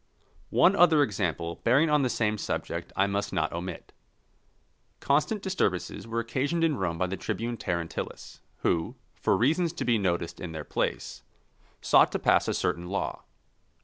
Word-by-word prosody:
One 195 Hz, -, +4 dB
other 165 Hz, -4 st, +6 dB
example 90 Hz, -, -2 dB
bearing 140 Hz, +7 st, +4 dB
on 150 Hz, -1 st, +4 dB
the 130 Hz, -, +1 dB
same 110 Hz, -3 st, 0 dB
subject 85 Hz, -2 st, -4 dB
I 95 Hz, -, +3 dB
must 100 Hz, +1 st, -2 dB
not 80 Hz, -, -1 dB
omit. 90 Hz, +2 st, -6 dB, 1.1 s
Constant 155 Hz, +9 st, +1 dB
disturbances 115 Hz, -, -1 dB
were 115 Hz, +1 st, -2 dB
occasioned 135 Hz, +8 st, -1 dB
in 160 Hz, -3 st, +3 dB
Rome 90 Hz, -7 st, -2 dB
by 95 Hz, -, +1 dB
the 95 Hz, +1 st, -3 dB
tribune 120 Hz, +1 st, -3 dB
Terentillus, 85 Hz, -6 st, -5 dB, 0.2 s
who, 80 Hz, -1 st, 0 dB, 0.2 s
for -, -, +1 dB
reasons 160 Hz, +7 st, +2 dB
to -, -, -4 dB
be 120 Hz, -3 st, +3 dB
noticed 85 Hz, -3 st, -1 dB
in 85 Hz, -2 st, -6 dB
their 80 Hz, -1 st, -5 dB
place, -, -, -3 dB, 0.6 s
sought -, -, +5 dB
to -, -, +1 dB
pass -, -, +3 dB
a -, -, 0 dB
certain 90 Hz, -1 st, -1 dB
law. 100 Hz, +2 st, -3 dB
105 Hz, 160 wpm, -28 LUFS, 90-145 Hz, 1.1 s, other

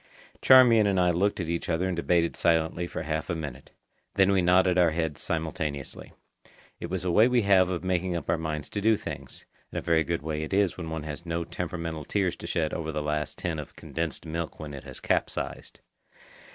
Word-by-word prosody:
Charmian 120 Hz, -5 st, +7 dB
and 95 Hz, -2 st, +2 dB
I 90 Hz, -1 st, +4 dB
looked 100 Hz, +4 st, +1 dB
at 85 Hz, -, -2 dB
each 85 Hz, +1 st, -2 dB
other 85 Hz, +2 st, +1 dB
and 95 Hz, -, -1 dB
debated 85 Hz, 0 st, +1 dB
silently 80 Hz, +1 st, +1 dB
for 80 Hz, -, -5 dB
half 80 Hz, 0 st, -3 dB
a 85 Hz, -, 0 dB
minute. 70 Hz, -5 st, -7 dB, 0.5 s
Then 95 Hz, 0 st, +4 dB
we 95 Hz, -1 st, +3 dB
nodded 90 Hz, +1 st, +4 dB
our 85 Hz, -1 st, +5 dB
heads 80 Hz, -2 st, -2 dB
simultaneously. 80 Hz, -4 st, -4 dB, 0.7 s
It -, -, -6 dB
is 95 Hz, -1 st, -2 dB
a 90 Hz, -, +1 dB
way 110 Hz, +7 st, +6 dB
we 125 Hz, -2 st, +2 dB
have 95 Hz, -2 st, +5 dB
of 90 Hz, -1 st, -3 dB
making 90 Hz, -1 st, 0 dB
up 85 Hz, -, -4 dB
our 85 Hz, -, +1 dB
minds 75 Hz, -2 st, -3 dB
to 100 Hz, -, -3 dB
do 110 Hz, +1 st, +4 dB
things; 70 Hz, -7 st, -8 dB, 0.3 s
and -, -, -5 dB
a -, -, -1 dB
very 80 Hz, -1 st, +3 dB
good 85 Hz, -2 st, -2 dB
way 75 Hz, -1 st, -2 dB
it 80 Hz, +5 st, -2 dB
is 100 Hz, -2 st, +2 dB
when 85 Hz, -3 st, -6 dB
one 80 Hz, -1 st, -4 dB
has 75 Hz, +2 st, -6 dB
no 85 Hz, 0 st, -2 dB
temperamental 85 Hz, -3 st, -5 dB
tears 95 Hz, -4 st, 0 dB
to -, -, -8 dB
shed 80 Hz, -2 st, -1 dB
over 80 Hz, -1 st, -3 dB
the 75 Hz, -1 st, -3 dB
last 75 Hz, 0 st, -2 dB
tin 85 Hz, -3 st, -3 dB
of 75 Hz, -, -9 dB
condensed 80 Hz, -2 st, -4 dB
milk 80 Hz, 0 st, -4 dB
when 75 Hz, -2 st, -7 dB
it 70 Hz, -, -9 dB
has -, -, -8 dB
capsized. -, -, -2 dB
85 Hz, 220 wpm, -27 LUFS, 80-90 Hz, 0.7 s, Charmian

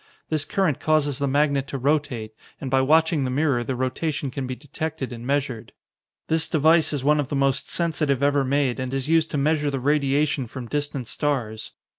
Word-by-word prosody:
This 155 Hz, -2 st, +1 dB
current 160 Hz, -3 st, 0 dB
causes 150 Hz, -3 st, +1 dB
the 140 Hz, -, 0 dB
magnet 140 Hz, 0 st, +1 dB
to 135 Hz, -, -4 dB
rotate 130 Hz, -5 st, -1 dB, 0.3 s
and 130 Hz, -, -5 dB
by 135 Hz, 0 st, +4 dB
watching 160 Hz, +2 st, +3 dB
the 130 Hz, -, -1 dB
mirror, 135 Hz, -2 st, +1 dB
the 130 Hz, +2 st, -3 dB
rotation 135 Hz, +2 st, -2 dB
can 135 Hz, -1 st, -4 dB
be 130 Hz, -, -4 dB
detected 150 Hz, -2 st, -5 dB
and 120 Hz, +1 st, -8 dB
measured. 135 Hz, -5 st, -2 dB, 0.5 s
"This 160 Hz, 0 st, +1 dB
device 160 Hz, 0 st, +4 dB
is 145 Hz, -4 st, -2 dB
one 150 Hz, +2 st, +3 dB
of 140 Hz, -2 st, -2 dB
the 145 Hz, -, -2 dB
most 135 Hz, -1 st, +1 dB
sensitive 150 Hz, -5 st, 0 dB
ever 145 Hz, -1 st, +3 dB
made, 135 Hz, -2 st, 0 dB
and 130 Hz, +1 st, -3 dB
is 135 Hz, 0 st, -2 dB
used 160 Hz, 0 st, +3 dB
to 150 Hz, -, -2 dB
measure 150 Hz, +1 st, +1 dB
the 135 Hz, -1 st, -2 dB
radiation 140 Hz, 0 st, +1 dB
from 125 Hz, +2 st, -7 dB
distant 145 Hz, -1 st, -2 dB
stars. 120 Hz, -5 st, -3 dB
140 Hz, 195 wpm, -24 LUFS, 130-150 Hz, 0.5 s, by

